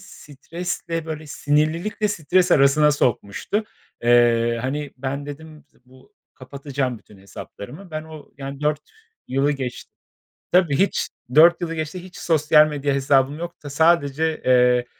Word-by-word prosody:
stresle, 165 0 -6
böyle 155 -1 -6
sinirlilikle 155 +9 0
stres 180 0 +1
arasına 150 +2 +4
sokmuştu. 130 - -1 0.4
Eee, 120 -1 +3
hani, 145 +2 -3
ben 140 +2 -4
dedim 155 +1 -10
z - - -42
bu: 130 +10 -21 0.2
"Kapatacağım 135 -2 -4
bütün 105 -1 -19
hesaplarımı." 120 - -11
Ben 155 0 -4
o, 155 -2 -13
yani 140 +1 -7
4 150 0 0 0.5
yılı 140 +3 +1
geçt 130 -3 -6 0.6
tabii 175 -6 +3
hiç, 195 +2 0 0.3
4 170 +3 +6
yılı 165 -1 -3
geçti 160 +3 -5
hiç 185 0 -13
sosyal 155 -1 +4
medya 145 -2 -2
hesabım 135 +1 +2
yok 170 -2 -8
da. 145 - -7
Sadece, 160 0 +1
eee, 125 -1 +4
150 Hz, 135 wpm, -22 LUFS, 135-160 Hz, 0.6 s, 4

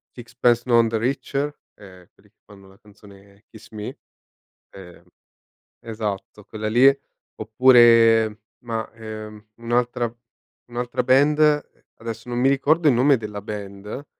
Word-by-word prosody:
Sixpence 120 0 0
None 115 -2 +3
The 110 0 -2
Richer, 140 +4 -2 0.2
ehm, 90 -3 -16
quelli 105 +1 -27
che 110 - -50
fanno 100 -2 -17
la 95 +3 -21
canzone 100 -1 -19
"Kiss 110 0 -15
Me". 105 -1 -8 0.7
Ehm, 90 -3 -14 0.8
esatto 105 -2 -6
quella 110 -1 -6
lì, 125 +4 +5 0.5
oppure 115 -2 +4 0.2
mah, 115 -2 -5
ehm, 110 -1 -10
un'altra 120 0 -2 0.5
un'altra 120 +1 -3
band, 145 +4 +3
ehm, 150 -1 +4 0.3
adesso 115 +1 -8
non 120 - -4
mi 130 +2 +2
ricordo 150 +4 +1
il 135 - +5
nome 130 +3 +3
della 105 -2 -7
band, 105 +5 -8
115 Hz, 130 wpm, -22 LUFS, 105-125 Hz, 0.8 s, lì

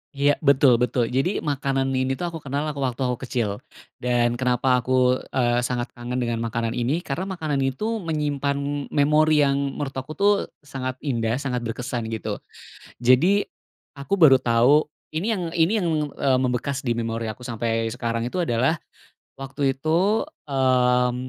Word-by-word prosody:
Iya. 140 +1 +2
Betul 135 -4 +4
betul. 125 -1 0
Jadi, 135 +10 0
makanan 135 -2 -1
ini 130 0 0
tuh 175 +4 -4
aku 165 - -6
kenal, 140 0 -3
aku 145 - -8
waktu 130 -1 -2
aku 125 -2 0
kecil. 105 -5 -2 0.4
Dan 120 -1 +1
kenapa 125 0 +2
aku, 125 +1 +2
eee, 120 -2 +1
sangat 120 -1 -3
kangen 120 +1 -6
dengan 115 -1 -2
makanan 115 0 -2
ini, 130 +9 -1
karena 175 +7 -3
makanan 155 -7 -2
itu 210 - -1
menyimpan 145 -3 -2
memori 150 +1 +3
yang 140 0 +2 0.2
menurut 145 -2 -3
aku 135 +4 -5
tuh 200 +5 +4 0.3
sangat 130 -3 -5
indah, 115 -5 0
sangat 130 -2 -2
berkesan 120 0 -4
gitu. 110 -2 -4 0.6
Jadi, 150 +12 +4 0.6
aku 140 +8 -4
baru 135 -5 +8
tahu, 125 +5 +4 0.3
ini 215 +7 0
yang 185 -4 -2
ini 165 +1 +2
yang, 175 - 0 0.3
eee, 130 -2 +2
membekas 130 +2 -1
di 120 - +1
memori 115 0 -3
aku 110 +2 -6
sampai 115 -2 -2
sekarang 115 -1 -2
itu 185 - -5
adalah 135 -1 +1 0.6
waktu 135 0 -2
itu, 170 +10 +1 0.2
mmm, 125 -2 +2
130 Hz, 160 wpm, -23 LUFS, 120-145 Hz, 0.6 s, baru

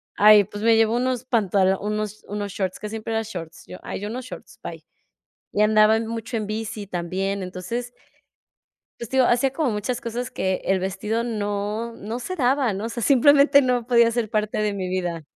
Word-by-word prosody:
"Ay, 210 -1 +7
pues, 205 +3 -8
me 225 0 +5
llevo 225 0 +3
unos 255 0 -1
pantalo 195 -6 +2
unos 210 0 -3
unos 205 0 -4
shorts", 190 -2 -3
casi 210 0 -6
siempre 225 0 -5
llevaba 225 0 0
shorts 170 -5 -8
yo, 90 - -9
"Ay, - - -5
yo 205 - -4
unos 250 +3 -5
shorts, - - -11
bye". - - -8 0.7
Y 210 - +2
andaba 215 +1 +5
mucho 230 +1 -4
en 215 - -4
bici 215 -1 -4
también. 190 +2 -2
Entonces, 230 +7 -5 1.0
pues, 235 - -7
te 265 - 0
digo, 255 - +5
hacía 250 +2 +2
como 290 -2 0
muchas 225 +3 -2
cosas 240 +2 -4
que 190 -6 -2
el 190 -1 +1
vestido 205 +4 -2
no, 210 0 -3
no 220 +4 -5
se 370 +9 -4
daba, 260 - +2
¿no? 200 +4 -4
O - - -3
sea, 235 - -5
simplemente 280 +2 +6
no 250 -2 0
podía 235 -2 +5
ser 230 -3 -1
parte 215 -1 -1
de 210 -1 0
mi 190 -2 -3
vida. 175 -3 -3
215 Hz, 200 wpm, -23 LUFS, 200-240 Hz, 1.0 s, Ay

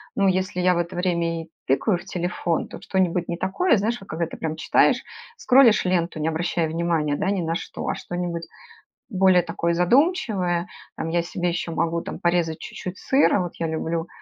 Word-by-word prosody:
ну, 200 -4 +3
если 185 -1 0
я 180 0 +3
в - - -1
это 170 0 -3
время 170 -2 0
и 160 - -18 0.2
тыкаю 175 +9 +2
в - - -13
телефон, 175 -2 -2
то - - -9
что-нибудь 180 -2 0
не 170 - -2
такое, 230 - +2
знаешь, 220 +4 0
когда 165 +1 -2
ты - - -9
прям 160 -1 -3
читаешь, - - +3 0.4
скролишь 250 - +5
ленту, 175 -3 0
не 155 - -1
обращая 165 +1 0
внимания, 165 -3 0
да, 195 +4 0
ни 195 -3 0
на 165 0 -1
что, - - -5
а - - 0
что-нибудь 175 -1 -4 0.7
более 190 -4 +4
такое 170 0 -1
задумчивое. 190 - +2 0.3
Там, - - -3
я 170 +1 +1
себе 175 +1 -3
еще 170 0 -3
могу, 165 +1 0
там, - - -7
порезать 170 -2 +1
чуть-чуть 185 0 -7
сыра. 265 -6 +3
Вот 175 -2 -3
я 165 - 0
люблю, 165 +1 -2
175 Hz, 190 wpm, -23 LUFS, 165-185 Hz, 0.7 s, скролишь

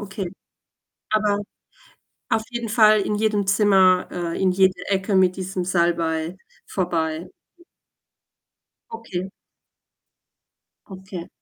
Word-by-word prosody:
okay. 195 -1 -5 0.8
Aber 210 -1 +1 0.9
auf 220 - +1
jeden 240 -1 -4
Fall 215 -1 +5
in 210 +1 -1
jedem 210 -2 0
Zimmer, 195 -2 +4
äh, 170 -1 -4
in 190 -1 +3
jede 190 0 +3
Ecke 195 +1 0
mit 185 -1 +3
diesem 185 -1 -3
Salbei 170 -1 0 0.3
vorbei. 170 -2 -2 0.3
Hm. 345 - -22 1.3
Okay. 195 -5 -5 1.6
Okay. 190 -2 -8
190 Hz, 100 wpm, -22 LUFS, 180-205 Hz, 1.6 s, Fall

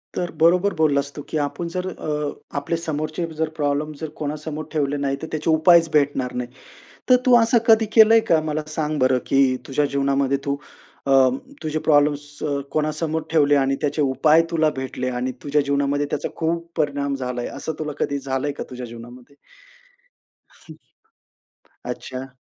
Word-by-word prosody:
तर 175 - -2
बरोबर 180 +4 +4
बोललास 145 -3 +1
तू, 145 - -6
की 155 - -2
आपण 170 +4 -5
जर 185 0 -2
अ, 150 -5 -5
आपले 145 +4 -1
समोरचे 155 0 -3
जर 160 -1 0
प्रॉब्लेम 145 +1 0
जर 160 - -4
कोणासमोर 155 +1 -4
ठेवले 145 -2 0
नाही, 140 -1 -1
तर 160 - -5
त्याचे 155 +1 -2
उपायच 165 +1 +5
भेटणार 140 -4 +1
नाही. 120 - -7 0.6
तर 255 - +8
तू 250 -1 +6
असं 230 +1 +3
कधी 220 0 +6
केलंय 225 +1 +8
का? 160 - +5
मला 155 +1 -1
सांग 155 -1 -1
बरं, 130 0 +3
की 135 - +2 0.3
तुझ्या 145 +2 +1
जीवनामध्ये 140 -1 +1
तू 140 0 -1 0.5
अ, - - +1 0.5
तुझे 155 0 -1
प्रॉब्लेम्स 145 -1 +3 0.2
अ, 145 -2 0
कोणासमोर 155 +1 -1
ठेवले 145 -2 +4
आणि 135 -1 +2
त्याचे 150 +1 0
उपाय 145 +4 +4
तुला 160 -2 +3
भेटले 130 -1 -3
आणि 130 +1 -1
तुझ्या 145 +1 +2
जीवनामध्ये 140 0 0
त्याचा - - -2
खूप 170 +1 -2
परिणाम 140 -2 0
झालाय, 125 -2 -4
असं 160 - -5
तुला 155 -1 -3
कधी 140 0 -1
झालंय 135 +2 -1
का - - -3
तुझ्या 125 0 -6
जीवनामध्ये? 120 +3 -12 1.2
हं. - - -15 1.1
अच्छा. 130 0 -6
150 Hz, 165 wpm, -22 LUFS, 140-160 Hz, 1.2 s, तर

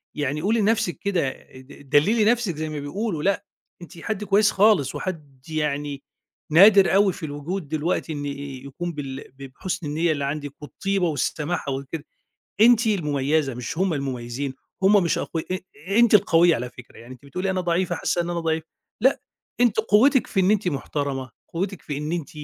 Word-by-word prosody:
يعني 145 0 -2
قولي 220 +6 +1
لنفسك 220 -3 +1
كده، 185 -9 0 0.3
د 130 +1 -14
دللي 205 - +4
نفسِك 230 -6 +2
زي 155 +1 -4
ما 155 -1 -4
بيقولوا. 165 +3 -3
لأ، 200 +1 +1 0.4
أنتِ 175 +1 -12
حد 210 +3 -3
كويس 205 +1 +3
خالص 200 -8 +3
وحد 145 -8 -6
يعني 145 -2 -2 0.5
نادر 195 +3 +7
أوي 200 -1 +4
في 165 - -7
الوجود 150 +4 -5
دلوقتي 155 +1 -1
إن 145 -1 -4
يكون 140 +3 -6
بال 135 -2 -6 0.2
بحسن 140 +5 -5
النية 160 +3 +1
اللي 145 -2 -1
عندِك 145 0 -4
والطيبة 195 +5 -1
والسماحة 150 +1 -2
وكده. 140 +3 -5 0.6
أنتِ 230 0 +6
المميزة 150 -6 +1
مش 125 +5 -6
هُم 185 -1 +1
المميزين. 130 -1 -4 0.3
هُم 200 0 +5
مش 170 - +1
أقوي 160 -1 -3
أ 185 - -1 0.4
أنتِ 235 -2 +5
القوية 175 -4 +5
على 125 +1 -4
فكرة. 120 0 -14
يعني 120 +2 -11
أنتِ 130 +2 -17
بتقولي 180 +8 -3
أنا 185 -1 0
ضعيفة، 175 +1 0
حاسة 175 - 0
إن 170 - -4
أنا 175 -1 -2
ضعيفة. 160 -1 -1 0.4
لأ، 265 +4 +3 0.4
أنتِ 235 -3 +3
قوتِك 230 +5 +4
في 195 - -1
إن 190 +2 +4
أنتِ 210 -3 +1
محترمة، 140 -3 -3 0.2
قوتِك 185 +2 -4
في 145 - -5
إن 150 +2 -4
أنتِ 170 -4 -3
160 Hz, 175 wpm, -24 LUFS, 145-195 Hz, 0.6 s, نادر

